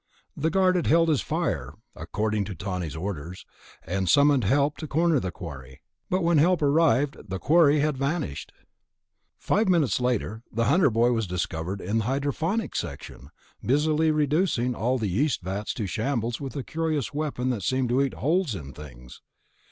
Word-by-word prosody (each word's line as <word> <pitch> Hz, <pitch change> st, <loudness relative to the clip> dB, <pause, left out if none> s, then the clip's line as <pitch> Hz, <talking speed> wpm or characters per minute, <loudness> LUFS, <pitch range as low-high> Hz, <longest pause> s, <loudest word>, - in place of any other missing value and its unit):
The 155 Hz, +2 st, 0 dB
guard 185 Hz, 0 st, +3 dB
had 175 Hz, -, -1 dB
held 165 Hz, +1 st, +4 dB
his 150 Hz, -4 st, +2 dB
fire 65 Hz, +4 st, -2 dB, 0.2 s
(according 110 Hz, -1 st, -2 dB
to 95 Hz, -, -6 dB
Tawney's 90 Hz, -5 st, -4 dB
orders) 90 Hz, 0 st, -6 dB, 0.4 s
and 95 Hz, +2 st, -1 dB
summoned 145 Hz, -5 st, +4 dB
help 140 Hz, +7 st, +2 dB
to 155 Hz, -, -6 dB
corner 160 Hz, 0 st, +2 dB
the 95 Hz, -, -3 dB
quarry... 70 Hz, -7 st, -9 dB, 0.3 s
but 185 Hz, 0 st, 0 dB
when 170 Hz, -2 st, +3 dB
help 170 Hz, +1 st, +3 dB
arrived, 145 Hz, -2 st, +3 dB
the 95 Hz, -, -2 dB
quarry 150 Hz, -, +4 dB
had 150 Hz, -2 st, 0 dB
vanished. 140 Hz, -, -3 dB, 0.9 s
Five 210 Hz, 0 st, +1 dB
minutes 155 Hz, -, +2 dB
later 115 Hz, -3 st, -1 dB
the 115 Hz, +1 st, 0 dB
Hunter 155 Hz, -, +4 dB
boy 115 Hz, +2 st, +2 dB
was 115 Hz, -4 st, 0 dB
discovered 90 Hz, +1 st, -3 dB
in 105 Hz, +5 st, -1 dB
the 110 Hz, -, -2 dB
Hydroponics 145 Hz, -, -1 dB
section, 70 Hz, -, -8 dB, 0.3 s
busily 155 Hz, +4 st, +2 dB
reducing 150 Hz, -4 st, +1 dB
all 125 Hz, +3 st, 0 dB
the 110 Hz, -, -2 dB
yeast 115 Hz, -, 0 dB
vats 100 Hz, +4 st, -3 dB
to 110 Hz, -, -3 dB
shambles 115 Hz, +3 st, -2 dB
with 135 Hz, 0 st, -6 dB
a 140 Hz, -, -3 dB
curious 155 Hz, -3 st, -2 dB
weapon 140 Hz, -4 st, -2 dB
that 115 Hz, -5 st, -3 dB
seemed 130 Hz, +5 st, 0 dB
to 125 Hz, +3 st, +2 dB
eat 135 Hz, -2 st, -1 dB
holes 160 Hz, -, 0 dB
in 70 Hz, -6 st, -8 dB
things. 65 Hz, -4 st, -12 dB
130 Hz, 170 wpm, -26 LUFS, 100-155 Hz, 0.9 s, held